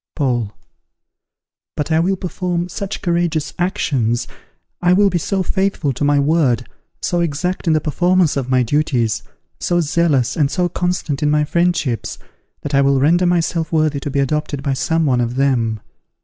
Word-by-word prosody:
Paul. 120 Hz, -8 st, 0 dB, 1.3 s
But 150 Hz, +2 st, -2 dB
I 160 Hz, -, +3 dB
will 185 Hz, +4 st, +1 dB
perform 180 Hz, -1 st, -3 dB
such 200 Hz, +2 st, -5 dB
courageous 170 Hz, -3 st, 0 dB
actions, 130 Hz, -, 0 dB, 0.5 s
I 175 Hz, 0 st, +4 dB
will 200 Hz, +1 st, +4 dB
be 175 Hz, -, 0 dB
so 190 Hz, +3 st, -1 dB
faithful 190 Hz, -7 st, 0 dB
to 135 Hz, -, -4 dB
my 145 Hz, 0 st, +3 dB
word, 140 Hz, -5 st, +2 dB, 0.4 s
so 175 Hz, -, 0 dB
exact 170 Hz, +3 st, -2 dB
in 160 Hz, -, +4 dB
the 155 Hz, -, +2 dB
performance 175 Hz, +2 st, +2 dB
of 135 Hz, -2 st, -2 dB
my 130 Hz, -1 st, +3 dB
duties, 125 Hz, -4 st, 0 dB, 0.4 s
so 175 Hz, -1 st, +1 dB
zealous 150 Hz, -6 st, +1 dB
and 145 Hz, -3 st, +2 dB
so 180 Hz, +3 st, 0 dB
constant 180 Hz, -6 st, -2 dB
in 150 Hz, -, +2 dB
my 150 Hz, 0 st, +3 dB
friendships, 170 Hz, -6 st, 0 dB, 0.4 s
that 145 Hz, -, -5 dB
I 140 Hz, -, +4 dB
will 140 Hz, -1 st, +3 dB
render 170 Hz, +6 st, +3 dB
myself 165 Hz, -2 st, 0 dB
worthy 155 Hz, -3 st, +1 dB
to 145 Hz, -, -5 dB
be 140 Hz, -, -3 dB
adopted 145 Hz, 0 st, -1 dB
by 140 Hz, -2 st, 0 dB
some 160 Hz, +4 st, 0 dB
one 125 Hz, -4 st, +2 dB
of 120 Hz, +1 st, -2 dB
them. 120 Hz, -5 st, +1 dB
155 Hz, 170 wpm, -18 LUFS, 140-175 Hz, 1.3 s, I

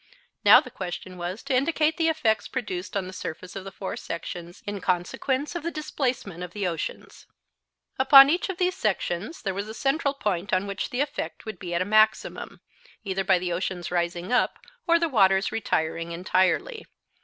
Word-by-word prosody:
Now, -, -, +9 dB
the -, -, -8 dB
question 185 Hz, 0 st, -6 dB
was 180 Hz, +4 st, -5 dB
to 275 Hz, -, -2 dB
indicate 310 Hz, +3 st, +2 dB
the 325 Hz, -1 st, +2 dB
effects 225 Hz, -9 st, +1 dB
produced 200 Hz, -7 st, -4 dB
on 190 Hz, -, -2 dB
the 185 Hz, -, -8 dB
surface 180 Hz, 0 st, -7 dB
of 195 Hz, -, -5 dB
the 195 Hz, -, -8 dB
four 190 Hz, -1 st, -5 dB
sections 170 Hz, +1 st, -7 dB
in 205 Hz, -1 st, -4 dB
consequence 225 Hz, -, -1 dB
of 345 Hz, -, -3 dB
the 335 Hz, -, -2 dB
displacement 255 Hz, -, -3 dB
of 180 Hz, -1 st, -6 dB
the 205 Hz, -2 st, -2 dB
oceans. 165 Hz, -3 st, -5 dB, 0.7 s
Upon 275 Hz, +1 st, +9 dB
each 345 Hz, +6 st, 0 dB
of 380 Hz, -, -4 dB
these 365 Hz, -1 st, +1 dB
sections 210 Hz, -, -2 dB
there 195 Hz, -3 st, -1 dB
was 200 Hz, +2 st, -4 dB
a 220 Hz, -, -7 dB
central 280 Hz, +3 st, 0 dB
point 200 Hz, -7 st, -2 dB
on 185 Hz, +1 st, +2 dB
which 200 Hz, -1 st, -4 dB
the 250 Hz, -, -1 dB
effect 290 Hz, -, -4 dB
would 220 Hz, -, -7 dB
be 175 Hz, -3 st, -4 dB
at 175 Hz, -, +2 dB
a -, -, -8 dB
maximum, 215 Hz, +1 st, +1 dB, 0.4 s
either 195 Hz, -2 st, -1 dB
by 190 Hz, -1 st, +4 dB
the 175 Hz, -1 st, -2 dB
oceans 180 Hz, 0 st, -3 dB
rising 175 Hz, +2 st, -1 dB
up 250 Hz, -, +2 dB, 0.3 s
or 335 Hz, -, +5 dB
by -, -, +4 dB
the 335 Hz, -, +3 dB
waters 195 Hz, -6 st, +3 dB
retiring 165 Hz, -5 st, -1 dB
entirely. 185 Hz, -, 0 dB
195 Hz, 190 wpm, -26 LUFS, 180-270 Hz, 0.7 s, Now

